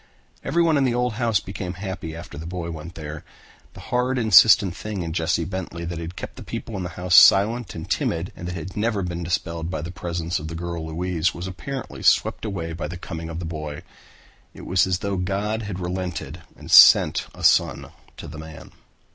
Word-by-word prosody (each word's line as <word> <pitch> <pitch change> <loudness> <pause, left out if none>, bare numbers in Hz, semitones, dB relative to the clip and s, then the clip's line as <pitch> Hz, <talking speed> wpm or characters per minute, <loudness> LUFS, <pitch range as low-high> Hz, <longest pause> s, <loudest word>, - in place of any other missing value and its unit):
Everyone 165 -2 +2
in 140 - +2
the 125 -2 +1
old 125 -1 0
house 115 -4 +2
became 95 -2 -6
happy 95 -4 -6
after 85 +2 -9
the 80 +3 -7
boy 85 -1 -4
went 80 +2 -8
there. 75 -1 -7 0.5
The - - -12
hard 125 +1 +1
insistent 105 -4 +6
thing 105 -4 -5
in 80 -1 -4
Jesse 85 0 0
Bentley 90 -2 -5
that 85 0 -4
had 85 +2 -7
kept - - -8
the - - -8
people 115 - -6
in 95 - -3
the 90 - -4
house 90 0 -2
silent 105 +2 +6
and 80 -1 -6
timid 85 +2 -1
and 90 - -7
that 90 - -4
had 90 +2 -7
never 105 -2 0
been 85 -1 -4
dispelled 85 -1 -2
by 80 -5 -4
the 85 - -5
presence 85 -1 -3
of 75 - -6
the 85 - -6
girl 85 -1 -5
Louise 85 +1 -1
was 85 - -6
apparently 130 +8 -6
swept - - +2
away 85 -6 -4
by 80 -2 -4
the 90 +3 -7
coming 80 -2 -7
of 80 - -5
the 85 - -5
boy. 75 -2 -6 0.7
It - - -10
was 95 0 +2
as 95 -1 +1
though 100 -1 -1
God 100 +4 -1
had 100 -4 -5
relented 90 -1 -4
and - - -10
sent - - +8
a - - -10
son - - +3 0.3
to - - -8
the 80 +1 -9
man. 80 0 -11
90 Hz, 210 wpm, -23 LUFS, 85-100 Hz, 0.7 s, sent